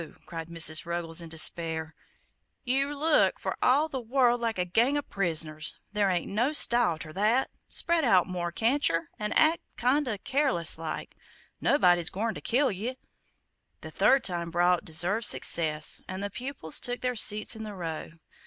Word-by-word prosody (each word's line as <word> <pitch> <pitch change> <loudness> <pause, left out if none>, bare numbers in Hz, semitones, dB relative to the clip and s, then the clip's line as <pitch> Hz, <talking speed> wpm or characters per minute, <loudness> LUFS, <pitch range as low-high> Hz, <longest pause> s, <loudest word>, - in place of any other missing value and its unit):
cried 165 -1 -8
Mrs. 160 -2 +1
Ruggles, 170 -1 -3
in 165 - -10
despair; 160 0 0 0.7
"Yer 275 +3 0
look 320 - +2
for - - -4
all 285 +5 +3
the 270 -4 -5
world 245 0 +1
like 230 -3 -2
a 180 - -1
gang 235 +10 +1
o' 290 - -2
pris'ners; 160 - -1 0.2
there 205 -2 +1
ain't 175 -2 -1
no 240 +9 0
style 235 - +3
ter 155 0 -9
that; 220 +8 0 0.2
spread 340 -1 0
out 190 -8 +3
more, 175 -2 -4
can't 245 +10 +1
yer, 165 0 -3
an' 210 0 -3
act 320 +2 +3 0.2
kind 265 +4 +1
o' 215 -4 -2
careless 260 - 0
like 165 -1 -6 0.4
nobody's 175 - +2
goin' 220 +4 -3
ter - - -9
kill 265 +3 +1
ye!" 225 +7 -5 0.8
The - - -9
third 270 -2 +3
time 170 -2 -3
brought 175 +1 +1
deserved 175 +8 +2
success, 155 -2 +3
and 185 +1 -6
the 205 - -4
pupils 250 - -3
took 245 0 -3
their 250 0 -1
seats 215 +1 +4
in 220 - -9
the 210 -2 -7
row. 165 -4 -6
205 Hz, 170 wpm, -27 LUFS, 170-255 Hz, 0.8 s, seats